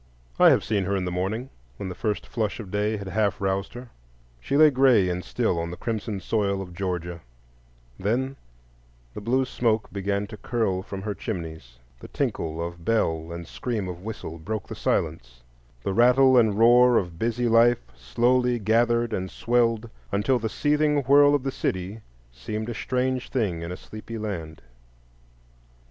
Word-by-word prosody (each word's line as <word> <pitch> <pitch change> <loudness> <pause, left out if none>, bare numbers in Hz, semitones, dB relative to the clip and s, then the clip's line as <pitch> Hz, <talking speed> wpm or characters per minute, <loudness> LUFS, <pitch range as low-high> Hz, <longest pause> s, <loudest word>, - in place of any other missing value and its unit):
I - - +8
have - - +4
seen 100 -3 0
her 100 +2 0
in 95 -1 -1
the 90 - -2
morning, 105 +8 -3 0.3
when 100 - -5
the - - -4
first 105 +2 -2
flush 110 -2 -2
of 100 -5 -8
day 105 +1 0
had 100 -2 -6
half 105 +2 0
roused 95 +2 -2
her; 120 -1 -9 0.5
she 140 - -1
lay 155 0 +7
gray 125 -8 +4
and 90 +1 -2
still 110 -8 -1
on 85 0 -3
the 90 - -7
crimson 110 -3 -3
soil 100 0 0
of 90 -2 -7
Georgia; 90 -2 -4 0.8
then 130 +7 -1 0.8
the - - -7
blue 130 +5 +1
smoke 115 -3 -1
began 100 +1 -1
to 105 +1 -10
curl 105 -4 -1
from 95 0 -7
her 105 0 -2
chimneys, 80 - -6 0.2
the - - -10
tinkle 80 +1 -2
of 85 0 -8
bell 80 -6 0
and 85 0 -7
scream 110 -6 -3
of 90 -1 -7
whistle 95 -6 -7
broke 105 +5 -4
the - - -6
silence, 60 -7 -2 0.4
the 95 - -1
rattle 125 +4 +5
and 110 -4 +4
roar 120 +1 +6
of 85 -3 -2
busy 120 +1 0
life 115 - +4
slowly 120 - +1
gathered 115 +1 +2
and 95 -1 -2
swelled, 115 0 +1 0.2
until 105 +6 +1
the 110 -1 -2
seething 150 +2 +1
whirl 145 +2 +6
of 140 - -1
the 135 - -1
city 95 0 -3 0.3
seemed 105 - -5
a - - -3
strange 130 +3 -1
thing 100 -10 -1
in 85 +1 -5
a 90 - -5
sleepy 110 +1 -9
land. 85 -8 -5
105 Hz, 175 wpm, -25 LUFS, 90-120 Hz, 0.8 s, I